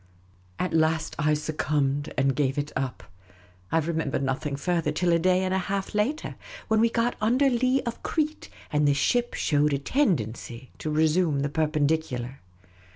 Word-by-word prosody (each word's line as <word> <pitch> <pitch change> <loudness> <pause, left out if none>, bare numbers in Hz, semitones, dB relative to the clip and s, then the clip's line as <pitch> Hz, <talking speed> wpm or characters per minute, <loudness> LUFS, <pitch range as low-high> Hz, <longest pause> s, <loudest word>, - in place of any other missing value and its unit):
At 180 - -2
last, 160 0 +1
I 150 0 +3
succumbed 150 -1 -1
and 135 -1 +2
gav^e 135 0 0
it 145 +1 -2
up. 135 -1 -3 0.7
I - - +3
remember 160 -3 0
nothing 140 +2 -2
further 165 +1 0
till 175 +3 +1
a 170 - +3
day 185 +2 +3
and 185 0 0
a 190 - +2
half 195 +2 -3
later, 235 +10 -1 0.4
when 220 0 +3
we 230 +1 +4
got 230 +1 0
under 255 +5 +3
lee 255 +2 +2
of 235 -2 -5
Crete, 310 -1 -2 0.2
and 150 0 +3
the 140 - +3
ship 240 - +1
showed 150 0 +2
a - - +2
tendency 130 - -1
to 155 - -3
resume 155 -1 +2
the 145 - 0
perpendicular. 145 -4 -1
155 Hz, 165 wpm, -26 LUFS, 145-195 Hz, 0.7 s, we